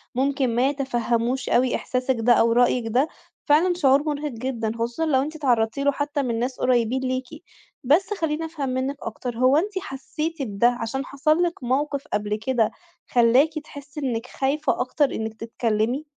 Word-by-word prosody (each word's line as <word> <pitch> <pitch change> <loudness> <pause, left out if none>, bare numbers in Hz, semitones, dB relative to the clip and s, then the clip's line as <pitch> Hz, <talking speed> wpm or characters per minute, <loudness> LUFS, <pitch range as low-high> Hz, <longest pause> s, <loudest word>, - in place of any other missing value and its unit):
ممكن 265 -2 +1
ما 255 +3 +3
يتفَهّموش 245 -2 -1
أوي 250 +1 +3
إحساسِك 255 0 -1
ده 240 +2 +5
أو 230 0 +4
رأيِّك 245 0 +3
ده. 255 +6 +2 0.4
فعلًا 325 +5 +4
شعور 280 -4 +3
مُرهق 295 -1 -2
جدًا 230 -2 -3
خصوصًا 235 +7 -2
لو 265 -4 +3
أنتِ 305 +3 -4
اتعرضتِ 240 -7 +1
له 285 0 +3
حتى 285 0 -2
مِن 235 -3 -1
ناس 250 +2 -2
قُريبين 250 0 +2
ليكِ. 255 0 -2 0.6
بس 335 +11 +3
خلّيني 325 -4 -2
أفهّم 305 -5 -4
منِك 260 +2 -1
أكتر، 230 +1 -5
هو 255 +3 +4
أنتِ 405 +6 0
حسيتِ 310 +1 -5
بده 220 -2 +2
عشان 265 +4 -3
حصل 305 +6 +1
لِك 340 -6 -2
مَوقِف 280 +3 0
قبل 210 0 0
كده 225 0 0 0.4
خلاكِ 260 +6 +3
تحسي 285 -1 -10
إنِك 245 -4 -2
خايفة 280 +4 0
أكتر 295 - +2
إنِك 220 0 -3
تتكلمي؟ 225 +4 -1
260 Hz, 165 wpm, -24 LUFS, 235-290 Hz, 0.6 s, ده